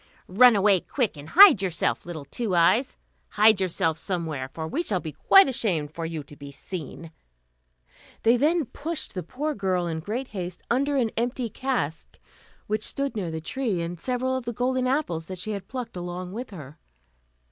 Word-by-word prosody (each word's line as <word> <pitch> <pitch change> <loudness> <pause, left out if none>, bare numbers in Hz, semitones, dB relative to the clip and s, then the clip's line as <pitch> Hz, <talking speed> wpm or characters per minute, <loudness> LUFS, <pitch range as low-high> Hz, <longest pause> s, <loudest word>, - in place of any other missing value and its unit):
"Run 240 +5 +6
away, 200 -1 +4
quick, 240 - -2
and 145 +1 -10
hide 365 - +8
yourself, 175 -3 -1
little 160 -5 -6
Two 200 - -3
Eyes; 195 +10 +3 0.3
hide 215 -1 +4
yourself 165 -3 0
somewhere, 160 -8 -3
for 160 +2 -5
we 295 - -1
shall 205 - -1
be 160 -3 -6
quite 390 - +6
ashamed 185 - -1
for 165 0 -4
you 160 -2 -5
to 145 - -14
be 140 0 -10
seen." 165 +2 -8 1.1
Then 230 +2 +5
they 320 +4 +2
pushed 305 +5 -4
the 185 - -3
poor 290 - -3
girl, 185 -5 -1
in 165 -2 -3
great 225 +10 -4
haste, 180 -3 -6
under 280 +4 +1
an 235 -4 +1
empty 240 +1 -2
cask, 225 - -3 0.5
which 215 0 -1
stood 275 +2 -3
near 190 -6 -3
the 160 0 -5
tree, 225 0 -2
and 170 0 -6
several 255 +1 0
of 260 -2 -4
the 235 - -3
golden 255 +2 0
apples 215 - -1
that 185 - -6
she 200 +5 -4
had 200 -2 -5
plucked 250 -3 -6
along 180 +1 -5
with 240 +5 -6
her. 150 -8 -11
195 Hz, 185 wpm, -25 LUFS, 165-250 Hz, 1.1 s, hide